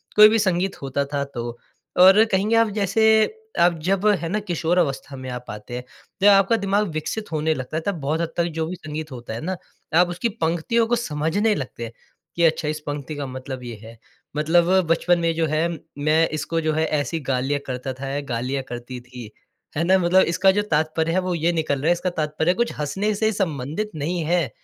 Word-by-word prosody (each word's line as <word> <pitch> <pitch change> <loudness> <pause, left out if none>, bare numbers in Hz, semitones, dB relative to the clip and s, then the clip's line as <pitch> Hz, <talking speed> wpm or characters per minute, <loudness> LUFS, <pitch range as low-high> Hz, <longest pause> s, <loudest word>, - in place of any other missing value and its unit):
कोई 210 0 +9
भी 225 +1 +2
संगीत 190 -2 0
होता 140 +1 -1
था 140 -1 0
तो। 120 -4 -6 0.4
और 190 +4 +8
कहेंगे 205 +4 +2
आप 230 -1 +4
जैसे 200 +1 +1 0.6
आप 175 0 +5
जब 195 +3 +1 0.2
है 165 - -3
ना 210 +4 0
किशोर 175 -3 -1
अवस्था 140 -4 -1
में 130 -1 -7
आप 125 0 -6
आते 105 +3 -8
हैं, 125 - -5 0.4
जब 200 - +6
आपका 195 +2 +6
दिमाग 205 0 +1
विकसित 190 +7 -4
होने 155 0 +1
लगता 145 +2 -4
था - - +3
बहुत 160 -2 -2
हद 165 -1 -3
तक 170 - +3
जो 160 - 0
भी 180 - -4
संगीत 155 -2 -7
होता 120 -3 -7
है 115 - -5
ना 185 +4 -2 0.4
आप 180 - +5
उसकी 180 +7 -1
पंक्तियों 170 +8 +1
को 240 - +2
समझने 205 +1 0
लगते 130 -5 -5
हैं, 115 - -6 0.4
कि 170 - +1
अच्छा 160 -2 +2
इस 155 0 -2
पंक्ति 145 +1 -4
का 145 -1 -4
मतलब 130 0 -7
ये 120 -2 -6
है। 115 +1 -12 0.4
मतलब 165 +3 +3 0.2
बचपन 170 +2 +2
में 165 -1 +1
जो 165 0 +1
है 155 +2 +1 0.3
मैं 155 +3 +3
इसको 155 +2 -2
जो 155 -1 0
है 160 +1 +1
ऐसी 155 +2 -1
गा 135 -3 -1
लिया 140 +3 -1
करता 130 0 -4
था, 135 +2 -7
या 140 +1 -2
गा 120 -5 -3
लिया 135 +3 -2
करती 120 +1 -6
थी, 125 -3 -10 0.5
है 160 - +1
ना। 190 +2 +4
मतलब 185 +1 +4
इसका 190 0 +5
जो 205 +2 +1
तात्पर्य 160 +1 +1
है 180 - +2
वो 185 -1 -1
ये 165 +1 +1
निकल 155 -4 0
रहा 150 - -1
है, 175 - +6
इसका 180 +1 -2
तात्पर्य 160 0 0
कुछ 235 +4 -1
हँसने 195 +8 -1
से 220 +2 +1
संबंधित 165 +1 -2
नहीं 165 +3 -2
है। 170 -4 +1
160 Hz, 220 wpm, -23 LUFS, 140-185 Hz, 0.6 s, कोई